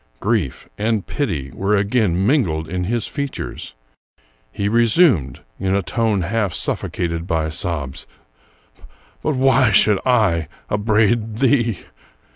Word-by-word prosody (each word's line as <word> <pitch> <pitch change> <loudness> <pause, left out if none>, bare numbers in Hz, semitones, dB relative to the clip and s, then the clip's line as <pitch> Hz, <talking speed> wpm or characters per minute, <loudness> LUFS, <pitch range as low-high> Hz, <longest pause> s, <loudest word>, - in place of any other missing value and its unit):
Grief 100 - -1
and 110 -1 0
pity 75 - -3
were 100 +2 0
again 100 -3 +1
mingled 85 - +1
in 90 +1 -3
his 115 +2 -1
features. 140 - -5 0.8
He 100 - -2
resumed, 115 - +3 0.2
in 95 0 0
a 100 - 0
tone 105 +4 0
half 100 -1 -1
suffocated 85 +1 -2
by 80 -3 0
sobs: 80 -5 -2 0.3
— - - -33
" - - -32
But 155 - -1
why 130 -1 +4
should 105 0 +4
I 105 -11 +2 0.2
upbraid 110 +1 +1
thee 120 -5 +1
105 Hz, 125 wpm, -20 LUFS, 85-115 Hz, 0.8 s, why